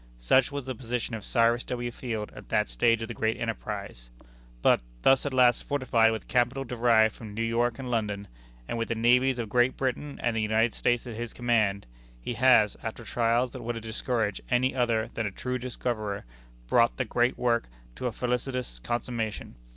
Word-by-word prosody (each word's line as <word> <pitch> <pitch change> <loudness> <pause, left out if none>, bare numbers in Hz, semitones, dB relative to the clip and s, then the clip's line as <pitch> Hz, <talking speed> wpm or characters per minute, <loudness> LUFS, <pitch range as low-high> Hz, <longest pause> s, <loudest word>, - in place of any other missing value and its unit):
Such 90 - +3
was 140 -2 -4
the 130 - -3
position 125 -1 -4
of 110 -2 -4
Cyrus 115 +2 +2
W. 120 -1 -3
Field 115 -4 -4
at - - -12
that - - +1
stage 115 - +2
of - - -4
the 120 - -5
great 110 0 0
enterprise. 100 - -5 0.5
But, - - +5 0.2
thus 135 +1 +4
at - - -2
last 125 -2 +4
fortified 120 -5 +2
with 110 - -5
capital 125 +2 +1
derived 115 -3 +3
from 105 -3 -10
New 115 - -1
York 115 +1 +1
and 130 -2 -5
London, 105 -3 -1 0.4
and 115 - -3
with 115 - -1
the 115 - -1
navies 125 +3 +3
of 115 -2 -3
Great 120 +4 +2
Britain 135 +2 -3
and 120 -1 +1
the 110 - +1
United 110 +2 +2
States 120 0 0
at 120 -3 -6
his 120 0 -5
command, 110 -5 +1 0.3
he 90 - -4
has, 115 -3 +5
after 110 +1 -6
trials 120 +2 +1
that - - -8
would 120 +1 -3
have 115 - -6
discouraged 110 -2 -2
any 125 +1 +2
other 115 -3 0
than 110 -2 -1
a - - -4
true 125 +6 -3
discoverer, 120 -5 -3 0.4
brought 115 - +3
the 130 - 0
great 120 +2 +1
work 120 -1 +1 0.3
to 125 - -3
a - - -1
felicitous 125 - -3
consummation. 115 - -3
120 Hz, 195 wpm, -28 LUFS, 110-125 Hz, 0.5 s, But